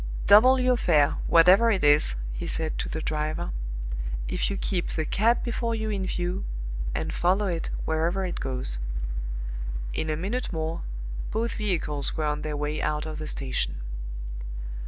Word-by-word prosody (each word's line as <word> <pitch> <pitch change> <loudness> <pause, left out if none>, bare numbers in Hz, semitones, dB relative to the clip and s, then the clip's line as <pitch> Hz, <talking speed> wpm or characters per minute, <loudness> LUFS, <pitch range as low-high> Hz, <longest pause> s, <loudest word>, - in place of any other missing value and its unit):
"Double 255 +6 +8
your 255 -1 +3
fare, 150 -9 +3
whatever 185 +7 +7
it 200 -7 +1
is," 145 - +5 0.2
he - - -4
said 160 -1 -1
to - - -2
the 160 - -3
driver, 155 - -1 0.8
"if - - 0
you 200 - -2
keep 180 -3 -1
the 160 - -1
cab 230 +8 +2
before 235 -1 -1
you 220 -1 -2
in 195 -2 -1
view, 180 +1 -2 0.5
and - - -2
follow 190 +4 +2
it 170 -4 -2 0.2
wherever 170 +4 +1
it 180 - -3
goes." 125 - 0 1.1
In 155 - -2
a 155 - 0
minute 210 +9 -2
more 160 -1 -2 0.5
both 230 +2 -1
vehicles 165 -10 0
were 155 - 0
on 150 0 0
their 150 -1 -3
way 150 +1 -2
out 150 0 0
of 155 -1 -5
the 155 - -4
station. 135 - -1
165 Hz, 160 wpm, -27 LUFS, 150-205 Hz, 1.1 s, Double